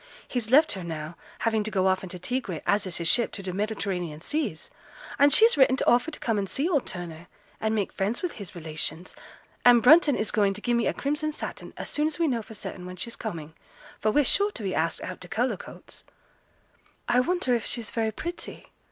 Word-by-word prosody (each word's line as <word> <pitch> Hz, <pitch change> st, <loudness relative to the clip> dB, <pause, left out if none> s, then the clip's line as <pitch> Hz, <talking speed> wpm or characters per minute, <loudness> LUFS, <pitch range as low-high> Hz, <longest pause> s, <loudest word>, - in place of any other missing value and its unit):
He's 240 Hz, -3 st, -3 dB
left 300 Hz, +5 st, +6 dB
her 190 Hz, -, -4 dB
now, 160 Hz, -1 st, -6 dB, 0.3 s
having 220 Hz, -2 st, +1 dB
to 215 Hz, -, -2 dB
go 190 Hz, -3 st, +1 dB
off 190 Hz, 0 st, +2 dB
in 190 Hz, -, -8 dB
t' 180 Hz, -, -6 dB
Tigre, 195 Hz, -, -3 dB
as 200 Hz, -1 st, +2 dB
is 180 Hz, -, -3 dB
his 170 Hz, -, -2 dB
ship, 235 Hz, +5 st, +3 dB
to 195 Hz, -, -6 dB
t' 185 Hz, -, -3 dB
Mediterranean 185 Hz, -5 st, -3 dB
seas; 285 Hz, -, -3 dB, 0.5 s
and 285 Hz, +1 st, +6 dB
she's 455 Hz, +7 st, +7 dB
written 265 Hz, -2 st, +5 dB
to -, -, -1 dB
offer 245 Hz, +6 st, +4 dB
to 295 Hz, -, -8 dB
come 225 Hz, -3 st, 0 dB
and 195 Hz, -1 st, -3 dB
see 285 Hz, +5 st, 0 dB
old 300 Hz, -8 st, +1 dB
Turner, 170 Hz, -1 st, -6 dB, 0.3 s
and 220 Hz, 0 st, 0 dB
make 205 Hz, -3 st, -1 dB
friends 205 Hz, -, -2 dB
with 355 Hz, -, -1 dB
his 200 Hz, -5 st, -9 dB
relations, 160 Hz, +1 st, -4 dB, 0.5 s
and 240 Hz, -2 st, +7 dB
Brunton 300 Hz, 0 st, +7 dB
is 215 Hz, -, -1 dB
going 200 Hz, -2 st, +2 dB
to 210 Hz, -, -8 dB
gi'e 240 Hz, -, 0 dB
me 235 Hz, -1 st, +2 dB
a -, -, +1 dB
crimson 300 Hz, +2 st, -1 dB
satin 300 Hz, -, -7 dB
as -, -, -5 dB
soon 300 Hz, +1 st, +1 dB
as 310 Hz, -, -3 dB
we 335 Hz, -1 st, +2 dB
know 240 Hz, -5 st, 0 dB
for 220 Hz, +1 st, -10 dB
certain 180 Hz, -2 st, -7 dB
when 180 Hz, -, -7 dB
she's 230 Hz, +6 st, -5 dB
coming, 165 Hz, -8 st, -6 dB, 0.5 s
for 215 Hz, -, +1 dB
we're 290 Hz, +6 st, +3 dB
sure 405 Hz, +9 st, +5 dB
to 240 Hz, -, -8 dB
be 190 Hz, -2 st, -2 dB
asked 160 Hz, +1 st, -1 dB
out 185 Hz, -, -6 dB
to 180 Hz, -, -8 dB
Cullercoats.' 230 Hz, 0 st, -4 dB, 1.0 s
'I 245 Hz, -, +3 dB
wonder 340 Hz, -1 st, +1 dB
if 235 Hz, -2 st, 0 dB
she's 235 Hz, -3 st, -3 dB
very 225 Hz, -2 st, 0 dB
pretty?' 345 Hz, +10 st, -7 dB
220 Hz, 225 wpm, -26 LUFS, 185-260 Hz, 1.0 s, she's